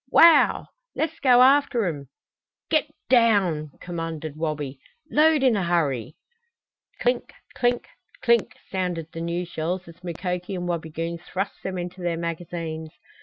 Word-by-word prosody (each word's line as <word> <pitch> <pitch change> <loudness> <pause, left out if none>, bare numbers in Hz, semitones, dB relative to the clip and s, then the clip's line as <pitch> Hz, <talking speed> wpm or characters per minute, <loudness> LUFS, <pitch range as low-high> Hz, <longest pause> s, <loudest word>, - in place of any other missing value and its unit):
Wow! 335 -1 +6 0.3
Let's 320 0 -2
go 250 -2 +6
after 265 -4 +4
'em!" 145 -6 -3 0.6
"Get 310 -1 +3 0.2
down!" 200 - +3
commanded 165 -3 -5
Wabi. 150 -4 -3 0.3
"Load 310 -1 +4
in 255 -4 +5
a 200 - +1
hurry!" 150 -7 0 0.8
Clink - - 0 0.2
clink 245 -1 0 0.4
clink 235 -2 +3 0.2
sounded 175 -4 -2
the 165 - -6
new 170 +1 -2
shells 175 +2 -3
as 170 +2 -14
Mukoki 180 +2 -3
and 175 -1 -3
Wabigoon 165 0 -3
thrust 190 +3 -4
them 190 -1 -4
into 180 +1 -6
their 175 -1 -1
magazines. 165 -1 -4
175 Hz, 130 wpm, -25 LUFS, 165-225 Hz, 0.8 s, Wow